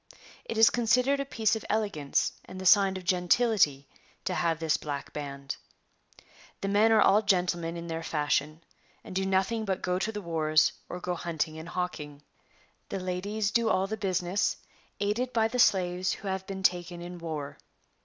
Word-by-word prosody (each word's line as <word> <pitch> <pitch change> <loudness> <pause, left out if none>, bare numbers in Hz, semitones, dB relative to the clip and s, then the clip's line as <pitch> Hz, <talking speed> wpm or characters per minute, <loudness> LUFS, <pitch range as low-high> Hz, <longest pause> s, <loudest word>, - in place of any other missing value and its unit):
It 225 - -4
is 225 0 +7
considered 250 +4 +2
a 275 - -1
piece 225 -5 +1
of 220 - -5
elegance 200 -10 0
and 185 - -9
the 185 - -6
sign 195 0 +5
of 185 - -8
gentility 180 - +2 0.4
to - - -1
have 165 -2 0
this 160 -1 +1
black 145 -2 -5
band.] 140 -2 -5 1.0
The 195 - -2
men 210 +3 +4
are 220 -1 +5
all 210 +2 +5
gentlemen 180 -4 0
in 170 - -6
their 165 -1 -4
fashion, 155 0 -1 0.4
and - - -9
do 190 0 0
nothing 195 +4 +1
but 195 -3 -2
go 180 0 0
to 215 +3 -1
the 210 - -5
wars, 155 -4 +2 0.2
or 180 - -5
go 180 0 -2
hunting 160 -2 -3
and 165 +1 -8
hawking. 150 -6 -4 0.7
The 195 - -3
ladies 200 +3 -2
do 230 0 +2
all 190 -2 +2
the 215 +3 -3
business, 185 -1 0 0.4
aided 225 +5 -1
by 225 -1 +3
the 250 +3 -3
slaves 185 -4 +3
who 200 - -8
have 190 0 -3
been 190 -1 -6
taken 175 -1 +1
in 175 0 -8
war. 155 -4 -5
185 Hz, 180 wpm, -28 LUFS, 165-210 Hz, 1.0 s, is